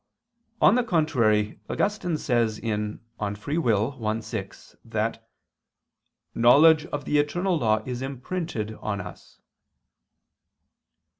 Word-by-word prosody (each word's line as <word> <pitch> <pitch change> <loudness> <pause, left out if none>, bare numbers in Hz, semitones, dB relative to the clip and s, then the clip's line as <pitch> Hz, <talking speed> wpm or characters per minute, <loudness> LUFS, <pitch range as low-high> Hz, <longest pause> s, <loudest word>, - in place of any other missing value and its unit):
On - - +7
the 250 +1 +3
contrary, 120 - +1
Augustine 200 -6 -1
says 115 -6 0
(De 110 -2 -1
Lib. 105 0 -4 0.2
Arb. 110 0 -1
i, - - -5
6) 115 - -8
that - - -3 1.0
"knowledge 150 +7 +6
of 145 -1 -5
the 150 - +2
eternal 175 +5 0
law 110 -3 +1
is 125 -1 -4
imprinted 135 - -4
on 100 -2 -2
us." - - -10
125 Hz, 105 wpm, -25 LUFS, 110-155 Hz, 1.0 s, On